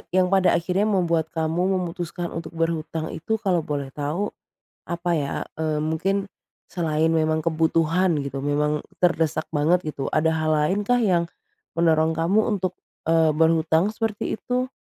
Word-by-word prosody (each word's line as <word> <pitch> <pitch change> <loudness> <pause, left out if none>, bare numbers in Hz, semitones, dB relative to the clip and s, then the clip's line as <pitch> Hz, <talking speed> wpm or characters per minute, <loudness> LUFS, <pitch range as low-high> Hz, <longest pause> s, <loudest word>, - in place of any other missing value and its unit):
yang 185 0 +3
pada 190 -1 +4
akhirnya 185 +5 +1
membuat 170 -5 +1
kamu 170 +4 0
memutuskan 175 -1 -4
untuk 165 0 -6
berhutang 165 -1 -2
itu 220 +8 -2
kalau 185 -4 +1
boleh 145 -3 -4
tahu 155 +8 -2 0.6
apa 175 0 -2
ya? 140 -1 -2 0.2
Eee, 155 -1 0
mungkin 195 +5 -1 0.4
selain 160 -2 +1
memang 155 -1 +1
kebutuhan 165 +2 +2
gitu, 140 0 -4
memang 150 +1 0 0.2
terdesak 160 -2 +2
banget 165 +4 +2
gitu. 135 -2 -4
Ada 160 +1 +3
hal 155 -1 0
lain 150 +7 +1
kah 245 0 +3
yang 175 -6 +2 0.5
mendorong 160 -1 +3
kamu 170 +6 +2
untuk, 185 -4 -1 0.3
eee, 160 -1 +4
berhutang 160 +3 +3
seperti 220 -1 -2
itu? 250 +1 -2
165 Hz, 145 wpm, -24 LUFS, 155-185 Hz, 0.6 s, pada